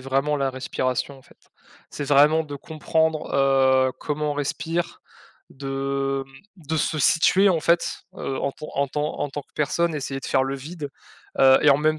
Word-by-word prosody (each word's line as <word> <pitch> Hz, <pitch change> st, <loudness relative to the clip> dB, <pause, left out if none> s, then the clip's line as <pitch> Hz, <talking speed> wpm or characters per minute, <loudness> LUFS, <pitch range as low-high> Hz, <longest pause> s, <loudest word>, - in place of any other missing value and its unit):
vraiment 135 Hz, +3 st, 0 dB
la 135 Hz, -1 st, 0 dB
respiration, 130 Hz, +1 st, -3 dB
en -, -, -19 dB
fait. -, -, -24 dB, 0.4 s
C'est 145 Hz, -, -5 dB
vraiment 150 Hz, +3 st, +4 dB
de 145 Hz, -1 st, -7 dB
comprendre 160 Hz, +1 st, -1 dB
heu, 135 Hz, -1 st, +4 dB
comment 150 Hz, 0 st, -2 dB
on -, -, -2 dB
respire. 165 Hz, +4 st, -3 dB, 0.5 s
De, 135 Hz, 0 st, -2 dB
mmh, 170 Hz, +7 st, -20 dB
de 160 Hz, -, 0 dB
se 155 Hz, 0 st, 0 dB
situer 170 Hz, +8 st, +4 dB
en 170 Hz, -3 st, +2 dB
fait, 170 Hz, +2 st, +1 dB, 0.2 s
heu, 135 Hz, -, -3 dB
en 140 Hz, -, -1 dB
tant 155 Hz, -, -9 dB
en 140 Hz, 0 st, +2 dB
tant 150 Hz, +3 st, -3 dB
en 145 Hz, -, -2 dB
tant 145 Hz, -, -4 dB
que -, -, -22 dB
personne, 160 Hz, +3 st, 0 dB
essayer 135 Hz, -1 st, -4 dB
de -, -, -7 dB
faire 135 Hz, -1 st, +2 dB
le 135 Hz, +1 st, -3 dB
vide. 145 Hz, +1 st, -7 dB, 0.5 s
Heu, 130 Hz, 0 st, +7 dB
et 150 Hz, -, +6 dB
en 140 Hz, -, +5 dB
même 155 Hz, +1 st, +1 dB
140 Hz, 190 wpm, -24 LUFS, 135-155 Hz, 0.5 s, Heu